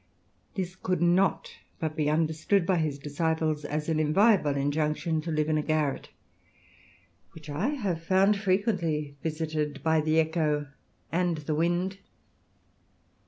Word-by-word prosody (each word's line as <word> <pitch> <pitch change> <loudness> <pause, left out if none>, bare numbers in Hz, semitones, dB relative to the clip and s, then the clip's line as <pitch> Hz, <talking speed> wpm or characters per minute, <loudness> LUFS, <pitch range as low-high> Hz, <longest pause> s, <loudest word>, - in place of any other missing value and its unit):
This 185 -2 -3
could 185 -2 -1
not 175 +3 +2 0.3
but 155 -1 -3
be 150 -2 +1
understood 160 +4 +1
by 185 0 +2
his 155 -3 -1
disciples 155 +1 -1
as 150 +1 -3
an 160 -1 +1
inviolable 155 0 +3
injunction 150 +3 0
to 165 - -6
live 155 -1 0
in 155 -1 +1
a - - +1
garret, 150 -2 -1 1.2
which 155 -2 -10
I 145 - -1
have 205 - -2
found 190 +4 +3
frequently 185 -7 0
visited 155 -2 -3
by 160 -1 +3
the 155 +1 +2
echo 155 -3 0 0.4
and 175 -1 +1
the 150 +1 -3
wind. 175 +4 0
160 Hz, 135 wpm, -28 LUFS, 150-180 Hz, 1.2 s, inviolable